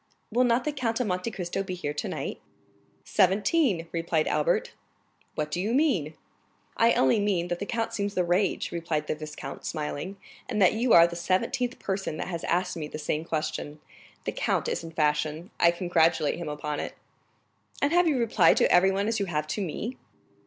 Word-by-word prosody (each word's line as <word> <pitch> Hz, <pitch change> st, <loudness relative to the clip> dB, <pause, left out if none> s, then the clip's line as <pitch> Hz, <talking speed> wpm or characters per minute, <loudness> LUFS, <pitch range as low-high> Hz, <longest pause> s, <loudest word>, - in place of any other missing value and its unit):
"Will 245 Hz, +3 st, +3 dB
not 240 Hz, +1 st, +2 dB
the 300 Hz, -, -1 dB
Count 245 Hz, -5 st, -1 dB
of 250 Hz, -, +1 dB
Monte 180 Hz, +2 st, -1 dB
Cristo 195 Hz, -2 st, -3 dB
be 190 Hz, -2 st, -4 dB
here 145 Hz, -5 st, -3 dB
tonight?" 150 Hz, -, -4 dB, 0.7 s
"Seventeen!" 195 Hz, -, +2 dB
replied 165 Hz, -2 st, 0 dB
Albert. -, -, +1 dB, 0.6 s
"What 150 Hz, 0 st, -2 dB
do 175 Hz, -, -1 dB
you 220 Hz, +5 st, 0 dB
mean?" 195 Hz, -, +1 dB, 0.6 s
"I 230 Hz, +1 st, +4 dB
only 130 Hz, +11 st, +3 dB
mean 190 Hz, -4 st, 0 dB
that 175 Hz, 0 st, -2 dB
the 200 Hz, -, -4 dB
count 230 Hz, -1 st, -2 dB
seems 205 Hz, 0 st, -2 dB
the 180 Hz, -, +2 dB
rage," 180 Hz, +2 st, 0 dB
replied 165 Hz, -3 st, -2 dB
the -, -, -1 dB
viscount, 155 Hz, 0 st, -8 dB
smiling, 155 Hz, +5 st, -4 dB, 0.3 s
"and 220 Hz, -4 st, -1 dB
that 185 Hz, -1 st, +5 dB
you 235 Hz, +2 st, 0 dB
are 170 Hz, 0 st, +9 dB
the 170 Hz, 0 st, -4 dB
seventeenth 190 Hz, +8 st, 0 dB
person 190 Hz, -5 st, -3 dB
that -, -, -4 dB
has 170 Hz, -2 st, -4 dB
asked 180 Hz, +1 st, 0 dB
me 155 Hz, -3 st, -4 dB
the 155 Hz, -, -7 dB
same 155 Hz, +1 st, -2 dB
question. 155 Hz, -2 st, -3 dB, 0.5 s
The -, -, -1 dB
count -, -, 0 dB
is -, -, -2 dB
in 165 Hz, -, -7 dB
fashion; 155 Hz, +1 st, -1 dB
I 170 Hz, -, +6 dB
congratulate 170 Hz, -3 st, +2 dB
him 170 Hz, -3 st, -4 dB
upon 150 Hz, 0 st, -3 dB
it." -, -, -5 dB, 0.8 s
"And 285 Hz, +3 st, +1 dB
have 350 Hz, 0 st, +4 dB
you 295 Hz, -4 st, +2 dB
replied 235 Hz, -1 st, +4 dB
to -, -, +3 dB
everyone 195 Hz, +3 st, +4 dB
as 225 Hz, -1 st, 0 dB
you 200 Hz, -, -1 dB
have 155 Hz, -3 st, -1 dB
to 210 Hz, -, -2 dB
me?" 205 Hz, -, -4 dB
180 Hz, 190 wpm, -27 LUFS, 160-220 Hz, 0.8 s, are